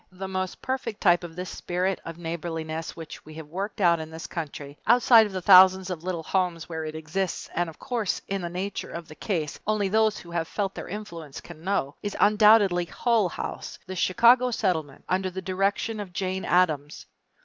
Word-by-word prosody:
The 190 +1 -6
most 185 -1 -4
perfect 250 -5 -3
type 175 -3 +4
of 165 -2 -8
this 180 0 -5
spirit 180 +2 -2
of 165 0 -8
neighborliness 165 -1 -4
which 165 -2 -9
we 155 0 -12
have 160 -1 -8
worked 195 +8 -5
out 170 -3 +4
in 160 0 -6
this 160 +1 -8
country, 145 -3 -6
outside 230 -1 +6
of - - -10
the 185 -1 -4
thousands 190 0 +7
of 170 -2 -5
little 175 -3 -3
homes 180 -2 -1
where 160 -2 -4
it 155 0 -6
exists 165 +4 -3
and 175 0 0
of 160 - -11
which, 235 -7 -2
in 195 -1 -2
the 175 - -4
nature 185 +3 -4
of 170 -1 -7
the 155 - -11
case, 160 -5 -3
only 210 -2 +1
those 220 +1 +2
who 170 - -11
have 165 -1 -1
felt 195 -2 -2
their - - -7
influence 170 -8 -7
can 165 -2 -12
know, 180 -7 -1
is 205 -1 -4
undoubtedly 210 -4 +5
Hull 225 0 +1
House, - - -6
the 190 0 -6
Chicago 235 +8 +4
Settlement 170 - -2
under 185 +1 0
the 185 +1 -6
direction 195 +4 -1
of 195 -4 -7
Jane 190 -1 -2
Addams. 155 -5 +1
185 Hz, 200 wpm, -26 LUFS, 165-200 Hz, -, thousands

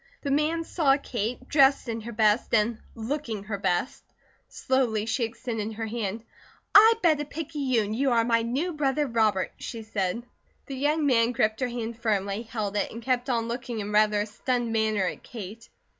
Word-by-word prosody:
The 280 - -1
man 310 +4 +1
saw 285 -5 +2
Kate, 250 -1 -4
dressed 275 -2 +4
in 230 -1 -3
her 235 +2 -7
best 215 +1 +2
and 225 +1 +1 0.2
looking 230 -3 -4
her 205 -1 -4
best. 180 +7 -1 0.5
Slowly 240 -5 0
she 230 +2 -1
extended 225 -1 -4
her 225 +1 -4
hand. 220 -1 -3 0.5
"I 445 +2 +9
bet 310 -4 +4
a - - -3
picayune 275 -8 -1
you 270 +4 +1
are 235 -2 +3
my 230 0 +2
new 270 +10 -1
brother, 295 -1 +1
Robert," 220 -6 +1
she 230 -2 -7
said. 210 +1 -2 0.4
The 275 - -6
young 295 +3 +1
man 240 -3 +3
gripped 220 -1 +1
her 255 - 0
hand 235 -1 -5
firmly, 205 -2 0
held 215 -3 -4
it, - - -1
and 230 +1 -8
kept 250 +1 0
on 230 -2 0
looking 240 -1 -4
in 205 0 -4
rather 210 0 +3
a - - -1
stunned 235 +2 -2
manner 220 -2 +1
at - - -4
Kate. 225 +1 -9
230 Hz, 185 wpm, -27 LUFS, 215-265 Hz, 0.5 s, I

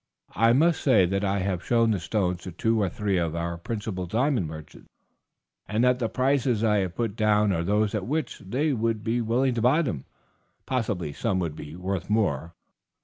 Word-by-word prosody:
I 115 +1 +4
may 160 +7 +5
say 125 - +3
that 95 +3 -1
I 100 0 +1
have 95 -1 -2
shown 115 -1 +3
the 100 - 0
stones 90 -1 -1
to 90 - -7
two 110 +6 0
or 100 - +1
three 100 +1 -1
of 85 -2 -1
our 85 0 -2
principal 95 0 -4
diamond 120 - +1
merchants, 80 -1 -11 0.8
and 110 +4 0
that 125 0 +3
the 115 -3 -1
prices 130 -4 +1
I 105 -2 +3
have 95 -3 -1
put 115 -4 -2
down 105 -2 +3
are 85 -3 0
those 105 +3 +1
at 105 -2 -2
which 155 +3 -2
they 140 +10 -1
would 115 -2 -1
be 115 +2 0
willing 125 +3 +1
to 115 - -2
buy 135 +8 +4
them; 85 - -4 0.6
possibly 100 - -2
some 100 +4 -1
would 85 -5 -2
be 75 +1 -9
worth 90 0 -4
more. 85 -7 0
105 Hz, 200 wpm, -26 LUFS, 90-120 Hz, 0.8 s, may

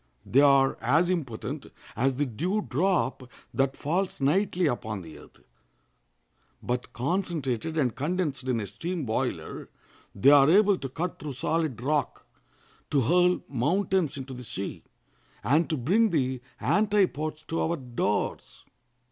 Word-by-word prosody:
They 135 - +4
are 140 -2 +4
as 160 +10 +3
impotent 135 -11 -4 0.3
as 130 +4 +1
the 145 +3 0
dew 180 - -1
drop 140 -4 0 0.2
that 135 0 0
falls 180 +6 -1
nightly 180 +6 +2
upon 110 - -2
the 80 -2 -11
earth; - - -18 1.2
but 125 0 -3
concentrated 160 - -2
and 130 -7 +1
condensed 150 -2 -2
in 125 -3 0
a 105 - -3
steam 165 - -4
boiler 110 -1 -3 0.5
they 130 +8 +5
are 140 0 +7
able 200 +2 +5
to 135 - -5
cut 170 +7 -4
through 145 -2 -5
solid 155 -1 -1
rock, 145 +4 -1 0.6
to 140 - +2
hurl 180 +7 +3
mountains 175 +4 0
into 135 0 -7
the 125 0 -8
sea, 100 -4 -5 0.6
and 150 +9 +2
to 155 - 0
bring 200 - +3
the 130 -6 0 0.2
antipodes 175 -5 +1
to 165 - -2
our 170 +1 0
doors. 120 -6 -3
145 Hz, 140 wpm, -27 LUFS, 125-175 Hz, 1.2 s, are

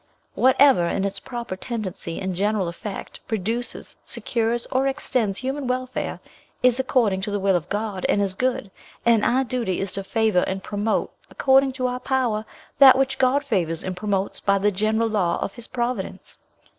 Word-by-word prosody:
Whatever, 260 -7 +5
in 195 +3 -1
its 200 0 -3
proper 240 -6 -6
tendency 190 -6 -5
and 190 -1 -2
general 205 0 0
effect, 180 +4 -7
produces, 225 +3 -2
secures, 235 0 -1
or 265 +1 +2
extends 250 -7 -1
human 270 +1 -3
welfare, 255 0 -2 0.4
is 250 0 +4
according 235 -7 +2
to 210 - -2
the 205 0 -1
will 195 -1 +2
of 170 -3 -2
God, 205 -2 -3
and - - +3
is 200 -2 +1
good; 245 -2 -1 0.3
and 230 -2 +4
our 260 +2 +3
duty 235 -7 -2
is 195 -1 -2
to 195 - -3
favour 220 -2 +2
and 190 0 -3
promote, 210 +1 -1 0.2
according 270 0 +3
to 255 -1 -2
our 250 0 -1
power, 250 -5 0 0.3
that 265 -2 +9
which 265 0 0
God 265 +2 +3
favours 175 - -1
and 185 -1 -4
promotes 195 0 -2
by 200 0 +2
the 205 +1 +2
general 215 +3 +1
law 190 -6 +1
of 195 - -3
his 240 - -9
providence. 245 0 -4
220 Hz, 175 wpm, -23 LUFS, 195-255 Hz, 0.4 s, that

